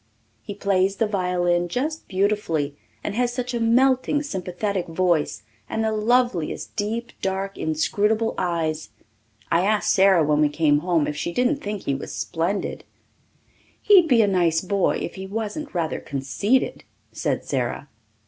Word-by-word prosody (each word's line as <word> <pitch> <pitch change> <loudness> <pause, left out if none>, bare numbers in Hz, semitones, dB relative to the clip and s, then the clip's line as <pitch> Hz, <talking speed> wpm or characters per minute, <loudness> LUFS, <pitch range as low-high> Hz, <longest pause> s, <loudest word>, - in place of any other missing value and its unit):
He 200 - -7
plays 195 -1 +1
the 225 - +1
violin 180 -3 0
just 295 - -3
beautifully 185 -7 0 0.3
and 205 - -3
has 245 +2 +1
such 250 0 -4
a 240 - -1
melting, 260 +5 +3
sympathetic 190 -4 -3
voice 165 -10 0 0.3
and 220 - -1
the 220 - +1
loveliest 220 -5 0
deep, 230 +3 -3
dark, 195 +1 -2
inscrutable 210 +8 0
eyes. 165 -3 -2 0.6
I 170 - +4
asked 215 +1 +2
Sara 190 -3 +5
when 150 0 +2
we 150 - +4
came 145 -1 +2
home 165 -2 +1
if 150 - -3
she 155 - -3
didn't 250 - +1
think 205 -6 -5
he 140 - -1
was 135 - -5
splendid. 175 +5 -2 1.0
"He'd 380 -5 +6
be 240 -6 +5
a - - +2
nice 170 -4 +2
boy 195 0 +1
if - - -5
he 190 0 -7
wasn't 220 +7 -5
rather 165 -3 -1
conceited," 140 - -1 0.3
said - - -2
Sara. - - -2
195 Hz, 150 wpm, -23 LUFS, 170-225 Hz, 1.0 s, He'd